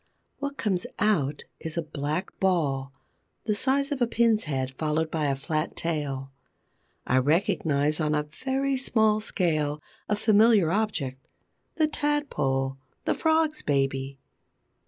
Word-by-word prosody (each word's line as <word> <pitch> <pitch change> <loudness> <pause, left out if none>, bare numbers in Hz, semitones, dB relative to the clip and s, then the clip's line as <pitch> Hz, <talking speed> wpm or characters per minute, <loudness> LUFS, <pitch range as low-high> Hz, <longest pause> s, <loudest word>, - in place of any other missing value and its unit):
What 280 0 -4
comes 190 -4 -1
out 155 -10 +1 0.2
is 160 +1 -6
a 170 - 0
black 155 +4 -4
ball, 145 -8 +1 0.5
the 215 - 0
size 275 +6 +1
of 275 -3 -2
a 240 - +4
pin's 230 -3 +2
head, 135 -3 -2
followed 155 +3 -1
by 155 -2 0
a 140 - +1
flat 155 +3 -2
tail. 140 -5 -3 0.7
I 130 - +3
recognize, 155 - +1
on 155 -1 +1
a 150 - +1
very 265 - -1
small 220 -4 +3
scale, 155 -8 0 0.3
a 210 - +3
familiar 210 -4 +4
object: 150 -11 -2 0.5
the 315 -2 +3
Tadpole, 145 - -1 0.3
the - - +2
Frog's 315 -1 +1
baby. 135 -1 0
160 Hz, 135 wpm, -27 LUFS, 145-220 Hz, 0.7 s, a